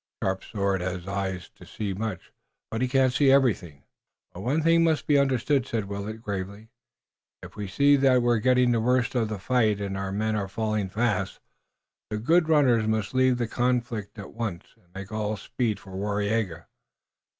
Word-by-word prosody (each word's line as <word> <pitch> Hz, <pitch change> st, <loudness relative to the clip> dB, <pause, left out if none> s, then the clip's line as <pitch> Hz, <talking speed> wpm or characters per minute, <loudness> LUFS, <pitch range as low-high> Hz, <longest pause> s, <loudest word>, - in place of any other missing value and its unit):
"Sharp 95 Hz, 0 st, -1 dB
Sword 100 Hz, -3 st, -1 dB
has 90 Hz, 0 st, -4 dB
eyes 95 Hz, -3 st, -3 dB
to -, -, -16 dB
see 105 Hz, -3 st, -4 dB
much, 105 Hz, -1 st, -5 dB, 0.4 s
but 110 Hz, -, -2 dB
he 130 Hz, -, +2 dB
cannot 130 Hz, 0 st, +2 dB
see 135 Hz, +1 st, +4 dB
everything." 100 Hz, -, +1 dB, 0.5 s
"But 90 Hz, -, -9 dB
one 145 Hz, +8 st, 0 dB
thing 165 Hz, +1 st, +4 dB
must 160 Hz, -2 st, +1 dB
be 145 Hz, -1 st, +4 dB
understood," 135 Hz, 0 st, +1 dB
said 110 Hz, -5 st, -2 dB
Willet, 100 Hz, +3 st, -6 dB
gravely. 100 Hz, +2 st, -5 dB, 0.7 s
"If -, -, -11 dB
we 105 Hz, -1 st, -5 dB
see 140 Hz, +9 st, +4 dB
that 130 Hz, -2 st, +4 dB
we 120 Hz, -, +2 dB
are 120 Hz, -2 st, +3 dB
getting 125 Hz, +1 st, +3 dB
the 115 Hz, -1 st, +1 dB
worst 125 Hz, +1 st, +1 dB
of 115 Hz, -4 st, 0 dB
the 105 Hz, -, -3 dB
fight 110 Hz, 0 st, +1 dB
and 100 Hz, -1 st, -3 dB
our 95 Hz, 0 st, -3 dB
men 110 Hz, +2 st, -1 dB
are 100 Hz, -2 st, -2 dB
falling 110 Hz, -1 st, -2 dB
fast, 105 Hz, -3 st, -1 dB, 0.7 s
the 105 Hz, -, -2 dB
good 160 Hz, +9 st, +2 dB
runners 125 Hz, -8 st, +4 dB
must 110 Hz, -1 st, -1 dB
leave 130 Hz, -1 st, +3 dB
the 120 Hz, -1 st, -1 dB
conflict 120 Hz, -4 st, -1 dB
at 100 Hz, -, -9 dB
once 110 Hz, -7 st, -5 dB
and 90 Hz, -, -31 dB
make 100 Hz, +2 st, -8 dB
all 110 Hz, 0 st, -2 dB
speed 110 Hz, +1 st, -2 dB
for 95 Hz, -, -14 dB
Waraiyageh. 100 Hz, -2 st, -2 dB
110 Hz, 185 wpm, -26 LUFS, 100-125 Hz, 0.7 s, see